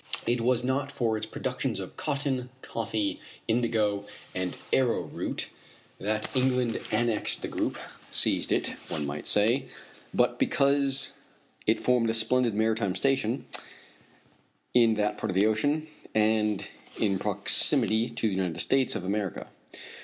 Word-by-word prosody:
It 120 0 +1
was 125 0 +2
not 135 +2 -1
for 115 -5 0
its 110 0 -3
productions - - -3
of - - -7
cotton, 135 -4 -2
coffee, 110 -2 -2 0.3
indigo, 110 -3 +1 0.3
and 90 -1 -3 0.2
arrowroot 130 -3 0 0.5
that 110 +2 -1
England 125 -2 +1
annexed 120 -3 +1
the - - -1
group - - -2 0.3
seized - - +3
it, - - +2 0.2
one 75 - -3
might 70 +1 -4
say; 120 +6 +3 0.4
but - - +1
because 140 -1 +2 0.6
it 110 - +3
formed 125 -2 +2
a 115 - +1
splendid 115 0 +2
maritime 110 -3 +1
station 135 -3 0 1.3
in 115 -2 +5
that 105 0 -1
part - - -2
of 90 - -2
the 100 +2 +4
Ocean, 145 +9 +1 0.3
and 105 -1 +2 0.3
in 100 -3 +1
proximity 110 +2 +3
to 115 -1 -1
the 105 - -1
United 95 -3 -2
States 135 -3 +3
of 95 -5 -4
America. 100 -1 -3
115 Hz, 135 wpm, -28 LUFS, 105-125 Hz, 1.3 s, in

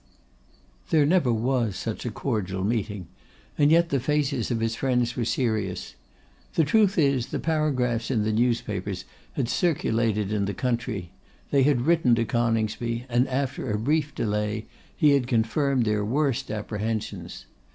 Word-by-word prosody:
There 155 -2 +4
never 160 -5 +3
was 115 -2 0
such 115 +4 -4
a - - 0
cordial 100 -6 -2
meeting; 105 -3 -2 0.5
and 145 0 +4
yet 170 +1 +4
the 140 - +1
faces 140 -2 0
of 120 -3 0
his 115 0 0
friends 125 -2 0
were 120 - -1
serious. 110 -6 -1 0.6
The 165 - +4
truth 200 +5 +3
is, 140 -6 +2
the - - -3
paragraphs 130 -8 0
in 115 -5 +1
the 110 - 0
newspapers 105 -5 -1 0.3
had 130 - -1
circulated 115 - 0
in 100 -2 +1
the 100 - -3
country, 115 -7 -2 0.4
they 140 - +4
had 135 -2 +3
written 150 -4 +3
to 115 0 0
Coningsby, 115 +1 -1
and 120 +2 +2
after 135 -1 -2
a 105 - 0
brief 145 +5 0
delay 105 0 -1 0.3
he 150 - +5
had 140 -3 +2
confirmed 125 +2 +1
their 105 -1 +1
worst 135 +3 0
apprehensions. 110 +1 -4
120 Hz, 150 wpm, -26 LUFS, 110-140 Hz, 0.6 s, he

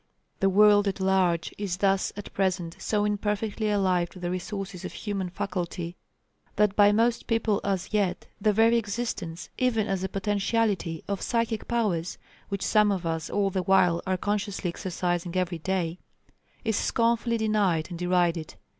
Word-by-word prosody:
The 195 - +3
world 205 +1 +5
at 195 - -1
large 190 -3 +1
is 195 -3 -2
thus 195 0 +2
at 205 - -8
present 185 -3 -1
so 210 -1 0
imperfectly 210 +1 -1
alive 185 -4 +2
to 185 - -13
the 175 0 -3
resources 190 0 -5
of - - -6
human 195 -4 -3
faculty, 180 -2 -4 0.6
that 210 -1 +2
by 205 -1 +6
most 230 +2 +1
people 225 -2 +1
as 195 -3 -1
yet, 200 -4 0 0.2
the 215 - +4
very 225 +3 +4
existence, 205 -6 -4
even 230 -4 +2
as 195 -2 -2
a 190 - -2
potentiality, 200 -3 0
of 200 -1 -2
psychic 230 -2 -1
powers, 195 -8 -1 0.3
which 200 -1 -2
some 210 -1 +4
of 185 -3 -2
us 165 -1 -2
all 200 -1 +1
the 190 - 0
while 180 -3 +3
are 185 0 +1
consciously 205 -1 -2
exercising 175 0 -2
every 180 -2 -1
day, 180 -1 -2 0.7
is 220 -2 +1
scornfully 230 +1 +1
denied 205 -7 +1
and 170 - -6
derided. 175 -2 +1
195 Hz, 160 wpm, -27 LUFS, 180-210 Hz, 0.7 s, by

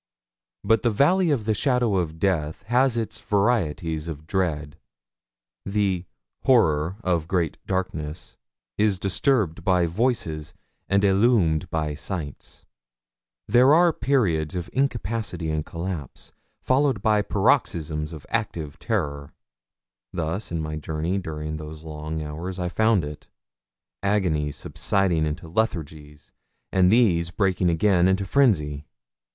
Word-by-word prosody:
But 115 -1 +3
the 120 - +2
valley 165 - +3
of 130 -8 0
the 110 - +2
shadow 120 -3 +1
of 80 -3 -2
death 80 -4 -1
has 125 +1 +2
its 115 -2 -3
varieties 85 -7 0
of 80 -2 -7
dread. 80 -5 -2 0.8
The 100 -3 0 0.4
'horror 85 - +3
of 85 -3 0
great 85 -3 -1
darkness' 85 -5 -4 0.4
is 105 -3 +3
disturbed 95 - 0
by 90 -1 +3
voices 85 - -1 0.3
and 100 +1 +3
illumed 95 -5 +3
by 75 -2 -1
sights. 75 -2 -7 0.8
There 125 +7 +6
are 170 0 +5
periods 95 - +1
of 90 -2 -4
incapacity 110 - -1
and 75 0 -1
collapse, 85 -4 -6 0.3
followed 130 -5 +2
by 105 -1 +3
paroxysms 75 -5 0
of 75 -3 -9
active 85 -10 -3
terror. 70 -11 -3 0.8
Thus 85 +5 -3
in 80 -2 -2
my 75 0 -4
journey 80 +5 -2
during 75 -3 -5
those 75 0 -9
long 80 0 -5
hours 85 +5 -5
I 90 -1 -2
found 110 -3 +2
it 75 0 -9 0.7
agonies 90 -8 0
subsiding 90 -6 0
into 75 +2 -5
lethargies, 80 -6 -3 0.4
and 95 -1 +4
these 90 -8 +3
breaking 95 -1 +1
again 90 +1 +3
into 95 +1 +1
frenzy. 75 - +2
90 Hz, 125 wpm, -24 LUFS, 80-105 Hz, 0.8 s, There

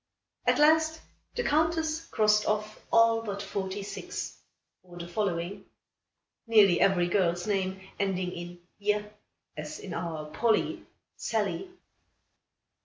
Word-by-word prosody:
At - - +4
last, 315 +1 +4 0.4
the 485 - 0
Countess 320 +1 +1
crossed 210 -1 +3
off 215 0 -1
all 230 0 +5
but 200 -3 -4
forty 195 0 -3
six; 200 - -5 0.5
or 175 -1 -14
the 170 0 -6
following; 175 -1 -2 0.8
nearly 205 -6 +6
every 180 -3 +4
girl's 175 -2 +1
name 190 -2 -1 0.2
ending 185 -2 0
in 175 0 -8 0.2
je, 210 0 +1 0.5
as 150 0 -6
in 190 - -7
our 165 -2 -4
"Polly," 220 +6 +1 0.3
"Sallie." 210 - -1
200 Hz, 115 wpm, -29 LUFS, 175-225 Hz, 0.8 s, nearly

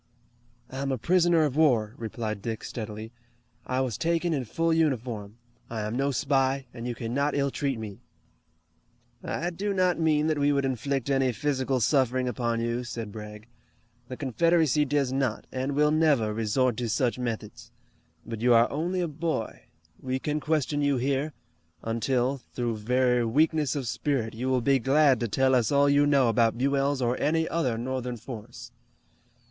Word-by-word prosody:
"I 130 - -7
am 140 0 -1
a 130 - 0
prisoner 175 +3 +3
of 145 -3 -1
war," 120 -9 +3
replied 110 -3 -4
Dick 110 0 -4
steadily. 110 -1 -6 0.6
"I 130 +1 0
was 125 -6 -2
taken 170 0 +1
in 135 -4 -2
full 165 +8 0
uniform. 120 -9 -1 0.3
I 115 -2 -4
am 105 +2 -3
no 135 +2 +1
spy, 135 -1 +1
and 120 0 -6
you 120 - -3
cannot 130 +6 -1
ill 140 -1 +1
treat 135 -3 -2
me." 105 -3 -8 1.2
"I 175 +2 -2
do 200 +4 -2
not 180 -2 +2
mean 155 -2 +2
that 155 -2 0
we 145 0 +3
would 140 -1 +1
inflict 135 +1 -2
any 135 -1 +2
physical 130 +2 -1
suffering 130 0 +2
upon 120 -1 -1
you," 120 +1 -1
said 115 -3 -6
Bragg. 105 0 -9 0.6
"The 130 - -7
Confederacy 155 +1 +2
does 140 -2 0
not, 135 -5 -1
and 130 +2 -2
will 150 +1 +3
never 145 -9 +2
resort 115 +2 +1
to 120 -2 -2
such 120 +1 0
methods. 115 -4 -5 0.6
But 115 -1 -6
you 120 0 +5
are 115 +1 +4
only 175 +5 -1
a 175 - 0
boy. 155 -6 -4 0.4
We 130 0 -2
can 150 +3 -2
question 150 -1 0
you 145 -2 +2
here, 135 +4 0 0.5
until, 125 +4 0 0.2
through 120 -3 -1
very 125 +2 +2
weakness 150 +4 +2
of 135 -4 -3
spirit, 120 -2 -1
you 125 +4 -3
will 130 -1 +2
be 135 +2 +3
glad 135 +1 +4
to 120 - -1
tell 130 +5 +2
us 120 -4 +2
all 140 0 +4
you 145 +1 +4
know 140 -3 +4
about 115 0 +2
Buell's 140 +1 +1
or 120 +1 0
any 160 +1 +1
other 130 -9 -1
Northern 125 0 -3
force." 115 0 -9
130 Hz, 175 wpm, -27 LUFS, 115-145 Hz, 1.2 s, you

